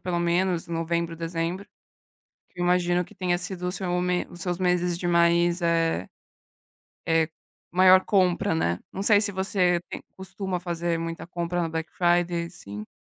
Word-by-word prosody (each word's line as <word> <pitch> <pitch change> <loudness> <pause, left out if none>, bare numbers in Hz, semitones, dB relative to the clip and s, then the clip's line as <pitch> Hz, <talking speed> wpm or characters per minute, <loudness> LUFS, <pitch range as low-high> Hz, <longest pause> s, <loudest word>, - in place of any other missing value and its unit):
pelo 175 -2 -2
menos, 175 0 +1
novembro, 170 0 -2
dezembro, 165 +3 -3 0.9
que 180 - -10
eu - - +1
imagino 175 0 +2
que - - -17
tenha 180 -2 0
sido 180 0 -5
o 180 - -1
seu 185 -2 -3
me 180 0 0
os 175 - -9
seus 180 -1 -2
meses 180 -1 +1
de 175 - -2
mais, 170 +1 +3
eh 165 - +1 1.0
eh, 165 -1 +2 0.4
maior 185 +1 +6
compra, 185 -4 +2
né. 85 - 0
Não 195 - -4
sei 205 -2 +5
se 205 -1 +1
você 185 -2 +1
tem - - -7
costuma 190 0 -4
fazer 170 -1 -2
muita 165 0 -5
compra 175 0 -2
na 165 - -1
Black 160 0 -4
Friday, 175 -1 +1
assim. 105 - -9
175 Hz, 165 wpm, -26 LUFS, 170-180 Hz, 1.0 s, maior